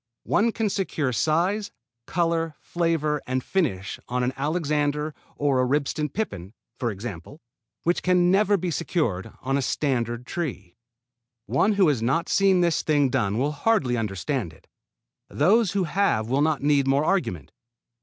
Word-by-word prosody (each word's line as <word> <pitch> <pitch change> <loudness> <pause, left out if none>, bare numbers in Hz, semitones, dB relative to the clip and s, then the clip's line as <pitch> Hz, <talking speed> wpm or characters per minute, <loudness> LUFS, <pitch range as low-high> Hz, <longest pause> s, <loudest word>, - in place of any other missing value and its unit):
One 230 +3 +2
can 225 -1 -1
secure 155 -9 -1
size, 175 - +1 0.4
color, 165 -2 0
flavor 160 -4 -1
and 130 0 -1
finish 100 - -1
on 125 0 0
an 125 +1 0
Alexander 150 0 -1 0.2
or 140 -3 +1
a - - +3
Ribston 145 +3 0
Pippin, 105 - -5 0.2
for 120 - 0
example, 105 - -7 0.4
which 175 +1 +1
can 180 -1 +3
never 205 +1 +4
be 180 -1 -2
secured 115 - -1
on 135 +2 0
a - - 0
standard 125 -4 -1
tree. 125 - -5 0.7
One 210 - +2
who 195 -3 +4
has 140 -7 +1
not 135 +9 0
seen 195 -2 +4
this 170 -2 +2
thing 145 -3 +2
done 110 -5 0
will 140 +4 +1
hardly 150 - +1
understand 105 - -2
it; - - -21 0.6
those 195 +7 +3
who 200 -2 +1
have 165 - +1
will 135 +4 +1
not 155 -2 +1
need 145 -2 +3
more 140 +3 +2
argument. 90 - -1
150 Hz, 155 wpm, -25 LUFS, 125-175 Hz, 0.7 s, never